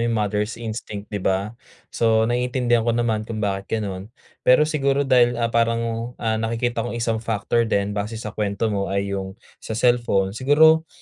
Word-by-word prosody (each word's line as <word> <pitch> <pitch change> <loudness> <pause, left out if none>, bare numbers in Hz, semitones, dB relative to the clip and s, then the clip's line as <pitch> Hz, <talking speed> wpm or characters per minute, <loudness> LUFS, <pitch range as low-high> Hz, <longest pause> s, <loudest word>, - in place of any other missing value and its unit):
yung 115 -1 0
mother's 105 +1 -1
instinct, 110 -2 -6
'di 100 - -2
ba? 95 +3 -1 0.4
So, 110 -1 +3
naiintindihan 120 0 +1
ko 115 - +2
naman 110 -2 -1
kung 115 - -4
bakit 100 -2 -2
gano'n. 100 -2 -5 0.3
Pero 130 +4 +5
siguro 140 -2 +1
dahil, 120 -2 +4
ah, 115 -1 -1
parang, 115 +1 0
ah, 110 -2 0
nakikita 115 +1 -1
kong 120 +1 -4
isang 115 -1 -1
factor 115 +1 0
din, 100 -1 0
base 105 +2 -3
sa 110 -1 -6
kuwento 105 +1 -1
mo 100 -1 -1
ay 100 0 -2
yung 95 0 -5 0.3
sa 110 - -5
cellphone. 120 -5 +2
Siguro, 160 +7 +4
115 Hz, 175 wpm, -22 LUFS, 105-120 Hz, 0.4 s, Pero